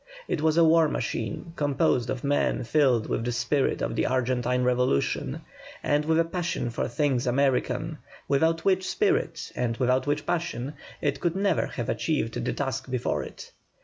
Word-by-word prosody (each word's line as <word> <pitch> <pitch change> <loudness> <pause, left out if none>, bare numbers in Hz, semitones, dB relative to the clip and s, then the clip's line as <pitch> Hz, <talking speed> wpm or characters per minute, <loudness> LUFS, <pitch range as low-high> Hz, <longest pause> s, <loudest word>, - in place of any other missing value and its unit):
It 155 - -1
was 160 0 +2
a 170 - +7
war 165 0 +5
machine, 120 +5 -3
composed 135 -4 +1
of 130 - -3
men 145 -2 +1
filled 125 -2 +2
with - - -1
the 120 - -1
spirit 120 +4 0
of - - -2
the - - +1
Argentine 125 0 +1
Revolution 125 - +1 0.4
and 145 +1 +1
with 160 +1 +2
a 165 - +3
passion 170 -8 -2
for - - -2
things 130 -1 0
American, 135 +3 0 0.3
without 160 +4 +2
which 190 -1 +2
spirit 420 +3 0
and 115 -2 -1
without 130 +1 +1
which 145 +1 0
passion 145 -5 -2 0.3
it 140 -1 0
could 175 +2 0
never 195 -3 +1
have 120 - -5
achieved 145 -8 -1
the - - 0
task 135 -1 -3
before 125 -1 -1
it. - - -10
140 Hz, 170 wpm, -27 LUFS, 125-160 Hz, 0.4 s, a